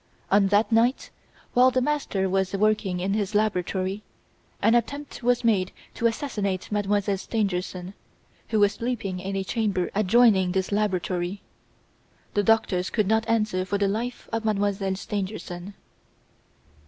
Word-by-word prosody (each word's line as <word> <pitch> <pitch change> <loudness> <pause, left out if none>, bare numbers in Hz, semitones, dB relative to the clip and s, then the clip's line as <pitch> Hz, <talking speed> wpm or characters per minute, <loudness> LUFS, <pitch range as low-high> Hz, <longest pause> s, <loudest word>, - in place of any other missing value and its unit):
On 200 0 +5
that 205 +4 +2
night, 235 +3 +2 0.4
while 250 +1 +6
the 255 0 +1
master 255 -8 0
was 190 0 0
working 205 -3 +1
in 190 +2 -1
his 205 0 -1
laboratory, 195 -1 0 0.6
an 225 - +3
attempt 280 +5 -1
was 245 0 +2
made 200 -5 +2 0.2
to 230 - +1
assassinate 210 -7 -3
Mademoiselle 205 -1 +1
Stangerson, 185 -3 -2 0.5
who 220 - 0
was 205 -1 +5
sleeping 205 -6 -3
in 195 +1 -4
a 195 - -1
chamber 200 -4 -1
adjoining 200 -2 +4
this 190 +1 -1
laboratory. 190 -2 -1 0.9
The 205 - +2
doctors 200 -4 +2
do 215 - +1
not 220 +3 +1
answer 215 -5 +1
for 200 +2 -1
the 200 0 +1
life 235 +5 -3
of 225 - 0
Mdlle. 200 -3 0
Stangerson." 195 -2 -5
205 Hz, 140 wpm, -25 LUFS, 190-225 Hz, 0.9 s, while